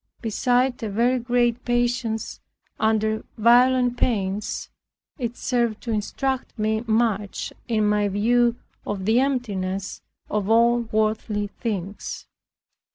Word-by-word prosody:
Beside 245 +2 +1
a 220 - -3
very 240 +5 +2
great 240 0 +1
patience 240 -2 -1 0.4
under 220 0 +1
violent 245 +2 +4
pains, 205 -4 -1 0.5
it 240 -1 -3
served 235 -4 0
to 235 - -3
instruct 255 +6 -2
me 220 +1 0
much 220 -3 0
in 220 -3 +1
my 210 0 +2
view 235 +4 +2 0.3
of 195 -2 -4
the 225 +4 +4
emptiness 200 -8 -2 0.3
of 210 -1 -2
all 235 +1 +5
worldly 215 -1 0
things. 200 -3 -4
225 Hz, 110 wpm, -24 LUFS, 210-245 Hz, 0.5 s, all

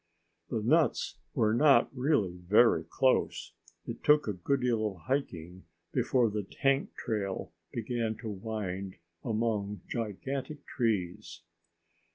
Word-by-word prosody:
The 110 -3 -2
nuts 155 +6 +2 0.2
were 110 -1 +3
not 140 +2 +4
really 125 - +1
very 90 0 +4
close. 85 -3 +1 0.3
It 115 - -7
took 150 -2 +5
a 105 - 0
good 130 +10 -1
deal 115 -3 +1
of 95 -5 -8
hiking 90 - -3 0.3
before 125 -1 +2
the 105 0 -1
tank 135 +7 0
trail 100 -5 -3 0.2
began 115 -1 -2
to 115 - -6
wind 100 -2 -4 0.3
among 105 -4 -1
gigantic 130 +6 -4
trees. 105 -8 -2
110 Hz, 120 wpm, -30 LUFS, 95-130 Hz, 0.3 s, took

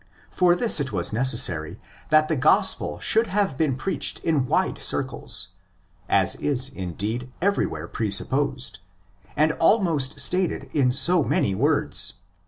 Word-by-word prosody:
For 180 -1 +2
this 225 -2 +2
it 135 -3 -2
was 90 -4 -2
neces 125 +2 +2
sary 80 -3 -4 0.3
that 155 0 +3
the 160 - -1
Gospel 100 - +2
should 225 +1 +1
have 195 -6 -1
been 140 -2 0
preached 155 +2 -1
in 150 -6 0
wide - - -1
circles; 85 - 0 0.6
as 95 -3 +3
is, 135 -2 -1
indeed, 110 +5 -5
everywhere 125 - -2
presupposed, 120 +3 -2 0.6
and 155 +2 +3
almost 165 -6 +1
stated 180 0 0
in 135 -4 +2
so 170 +6 +4
many 100 - 0
words - - +1
(x. - - -31
135 Hz, 140 wpm, -23 LUFS, 110-165 Hz, 0.6 s, so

